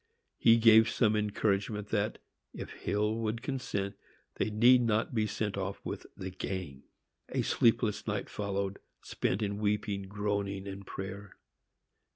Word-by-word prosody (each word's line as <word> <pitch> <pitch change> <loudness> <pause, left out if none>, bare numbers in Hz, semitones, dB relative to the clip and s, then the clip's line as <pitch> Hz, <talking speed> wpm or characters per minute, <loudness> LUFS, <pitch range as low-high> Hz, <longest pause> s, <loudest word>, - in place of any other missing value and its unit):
He 115 0 +6
gave 110 -1 +7
some 110 -2 +2
encouragement 105 0 0
that, 105 0 0 0.4
if - - -6
Hill 105 +2 -1
would 115 +1 -2
consent, 115 -8 -2 0.4
they - - 0
need 120 +4 +6
not 115 -1 +1
be 110 -2 +1
sent 105 -2 -2
off 100 0 -3
with - - -5
the 95 -1 -5
gang. 90 -7 -5 0.5
A - - 0
sleepless 115 -2 +2
night 100 -2 -2
followed, 100 -1 -3 0.2
spent 100 +4 -1
in 100 0 -2
weeping, 105 -2 -1
groaning 100 -1 -2
and 100 0 -7
prayer. 95 +1 -7
105 Hz, 140 wpm, -31 LUFS, 100-110 Hz, 0.5 s, gave